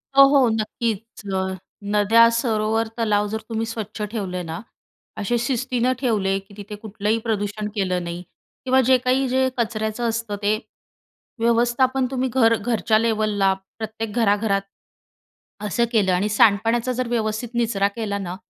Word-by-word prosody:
हो, 275 - +9
हो, 275 -4 +5
नक्कीचं. 215 -3 -3
अ, - - -5 0.4
नद्या 225 +3 +6
सरोवर 225 -1 0
तलाव 210 -2 +1
जर 220 - -3
तुम्ही 225 0 -1
स्वच्छ 220 -1 -6
ठेवले 185 -5 -3
ना, 165 0 -5 0.6
असे 235 +4 0
शिस्तीनं 250 0 0
ठेवले 205 -7 +1
की 195 +1 -18
तिथे 205 +1 -7
कुठलंही 210 +1 -2
प्रदूषण 210 -1 -2
केलं 185 -3 0
नाही 170 +1 -5 0.4
किंवा 260 0 +4
जे 260 +1 +4
काही 255 +2 +1
जे 260 0 +2
कचऱ्याचं 220 0 -1
असतं. 225 -2 -3
ते 210 +1 +2 0.8
व्यवस्थापन 240 +3 +2
तुम्ही 260 0 -1
घर 230 -3 +4
घरच्या 220 -1 +1
लेव्हलला 215 -4 +1 0.2
प्रत्येक 220 0 -5
घराघरात 205 -3 +2 1.1
असं 235 +4 +1
केलं 200 -5 +3
आणि 195 +4 +1
सांडपाण्याचा 225 +4 +3
जर 250 0 -2
व्यवस्थित 220 0 -2
निचरा 220 -4 +1
केला 210 -3 -2
ना, 185 -2 -5
220 Hz, 145 wpm, -22 LUFS, 205-235 Hz, 1.1 s, हो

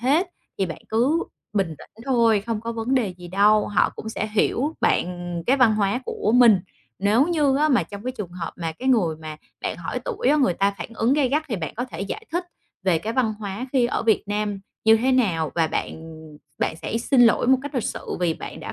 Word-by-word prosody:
hết, 290 +10 +2 0.3
thì 195 - +1
bạn 165 - -6
cứ 260 +10 +2 0.3
bình 190 -6 0
tĩnh 225 +2 -15
thôi, 230 -5 +3
không 225 -2 -2
có 230 +1 -4
vấn 230 +3 -1
đề 245 -6 +2
gì 175 -1 -10
đâu, 205 +3 +4
họ 205 - +2
cũng 220 - -6
sẽ 220 - -3
hiểu 270 +8 +1
bạn - - +2 0.4
cái 265 +3 +4
văn 235 -5 +5
hóa 205 +3 +1
của 215 - -1
mình. 230 -6 +7 0.4
Nếu 215 +7 +3
như 295 -5 +2
á 305 +2 +3
mà 255 - +3
trong 200 +1 -9
cái 255 - -2
trường 210 -8 -6
hợp 175 -2 -5
mà 165 -2 -3
cái 255 +11 -4
người 185 -11 +2
mà 155 -1 -8 0.3
bạn - - -2
hỏi - - -4
tuổi 480 -1 -1
á 300 - +5
người 260 - +2
ta 200 +2 +2
phản - - -5
ứng 225 +3 +2
gay 280 -3 +2
gắt, 300 +4 +1
thì 225 - -2
bạn 160 -4 -5
có 245 +3 -2
thể 255 - -8
giải 310 - -5
thích 350 +1 -1 0.4
về 185 -4 +2
cái 215 +7 -4
văn 230 -4 +1
hóa 205 +4 -5
khi 255 -3 +3
ở 240 - -2
Việt 225 -2 +3
Nam 205 -1 -2 0.2
như 220 0 +7
thế 255 +4 +1
nào 180 - +1
và 165 -2 +2
bạn 160 0 -5 0.4
bạn 160 - -1
sẽ 225 - -4
xin 250 +2 +2
lỗi 235 +1 +4
một 260 0 +5
cách 285 +1 -7
lịch 250 - -1
sự - - -4
vì 170 -2 +1
bạn - - -8
đã - - -6
225 Hz, 240 wpm, -23 LUFS, 195-255 Hz, 0.4 s, mình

